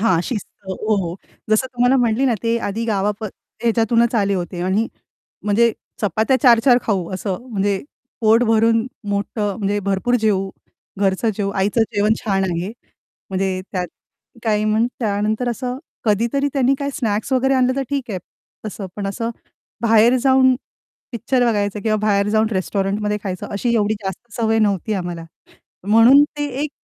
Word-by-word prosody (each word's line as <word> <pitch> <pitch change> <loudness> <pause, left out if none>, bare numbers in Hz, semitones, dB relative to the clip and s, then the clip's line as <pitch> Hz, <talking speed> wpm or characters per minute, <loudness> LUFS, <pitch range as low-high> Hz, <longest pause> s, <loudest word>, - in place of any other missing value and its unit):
हां, 185 -6 +3
शिस्त 215 0 -4 0.2
हो, 215 +3 -1
हो. 180 -2 -3 0.3
जसं 215 +4 +3
तुम्हाला 245 +2 +3
म्हटली 235 +2 +1
ना 245 - +2
ते 230 0 +1
आधी 220 +3 -3
गावा 205 -2 +1
अ, - - -1 0.4
याच्यातूनच 230 +1 +2
आले 200 -3 +2
होते 175 -1 -4
आणि 205 +5 +1 0.6
म्हणजे 225 +2 +3 0.3
चपात्या 220 +6 +2
4-4 245 -1 +6
खाऊ 190 -6 -1
असं 190 0 -3
म्हणजे 200 -2 0 0.5
पोट 225 +1 +4
भरून 225 +1 +3 0.2
मोठं 205 0 -1
म्हणजे 205 0 0
भरपूर 200 +5 +1
जेवू, 195 -2 +1 0.5
घरचं 195 +3 +1
जेवू 200 -2 -1
आईचं 210 +4 +2
जेवण 210 +2 +3
छान 195 -2 +1
आहे 175 0 -2 0.6
म्हणजे 190 -1 -1
त्यात 180 -2 -1 0.6
काही 215 -1 +1
मग 215 +2 +2
त्यानंतर 215 +2 0
असं 250 +2 -3 0.3
कधीतरी 235 +6 +1
त्यांनी 270 -1 +3
काही 280 0 -2
स्नॅक्स 220 -3 -1
वगैरे 265 +1 +3
आणलं 255 0 +2
तर 275 - 0
ठीक 275 -4 -2
आहे 190 - -2 0.5
तसं, 200 -1 -6
पण 205 -1 -3
असं 230 +4 -3 0.5
बाहेर 230 +2 +5
जाऊन 260 -1 +5 0.6
पिक्चर 245 +2 +1
बघायचं 205 -2 0
किंवा 215 -1 +1
बाहेर 200 -1 +2
जाऊन 215 +1 +2
रेस्टॉरंटमध्ये 200 +2 -1
खायचं 185 -2 -4
अशी 235 +4 0
एवढी 215 -1 +2
जास्त 190 +4 -6
सवय 225 -1 +1
नव्हती 210 -1 +1
आम्हाला. 175 -2 -5 0.6
म्हणून 230 +6 +7 0.2
ते 290 - 0 0.2
एक 300 - -2
215 Hz, 155 wpm, -20 LUFS, 200-235 Hz, 0.6 s, म्हणून